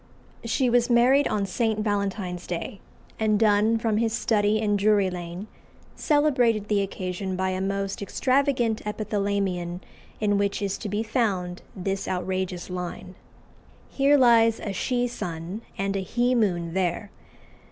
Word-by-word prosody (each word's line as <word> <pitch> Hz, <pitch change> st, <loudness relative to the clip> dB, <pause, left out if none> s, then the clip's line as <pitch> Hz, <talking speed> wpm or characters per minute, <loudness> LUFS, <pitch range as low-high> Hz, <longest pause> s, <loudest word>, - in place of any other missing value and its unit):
She 240 Hz, +3 st, +1 dB
was 240 Hz, 0 st, +3 dB
married 250 Hz, +4 st, +4 dB
on 205 Hz, -2 st, 0 dB
St. 220 Hz, +3 st, 0 dB
Valentine's 200 Hz, -4 st, -2 dB
Day; 180 Hz, +3 st, -5 dB, 0.4 s
and 215 Hz, -1 st, +2 dB
Donne, 215 Hz, +1 st, +3 dB
from 225 Hz, -2 st, 0 dB
his 225 Hz, 0 st, +1 dB
study 210 Hz, -2 st, +2 dB
in 210 Hz, -1 st, +1 dB
Drury 200 Hz, -2 st, +3 dB
Lane, 175 Hz, +2 st, -6 dB, 0.5 s
celebrated 250 Hz, -, +2 dB
the 205 Hz, -1 st, +2 dB
occasion 185 Hz, -1 st, -4 dB
by 190 Hz, +1 st, 0 dB
a 185 Hz, 0 st, -2 dB
most 195 Hz, 0 st, -2 dB
extravagant 255 Hz, +1 st, +1 dB
epithalamion 200 Hz, -4 st, -2 dB, 0.4 s
in 205 Hz, -1 st, +1 dB
which 200 Hz, 0 st, 0 dB
is 200 Hz, -1 st, -2 dB
to 210 Hz, -, -5 dB
be 205 Hz, +2 st, -1 dB
found 195 Hz, -7 st, -1 dB
this 195 Hz, +1 st, -3 dB
outrageous 185 Hz, -1 st, -2 dB
line 180 Hz, 0 st, -6 dB, 0.8 s
"Here 280 Hz, +1 st, +3 dB
lies 230 Hz, -3 st, +5 dB
a 200 Hz, -, -4 dB
She 245 Hz, +5 st, 0 dB
sun, 175 Hz, -2 st, -5 dB, 0.2 s
and 195 Hz, 0 st, -1 dB
a -, -, 0 dB
He 240 Hz, +6 st, 0 dB
moon 175 Hz, -8 st, 0 dB
there." 190 Hz, +2 st, -1 dB
205 Hz, 140 wpm, -25 LUFS, 185-230 Hz, 0.8 s, lies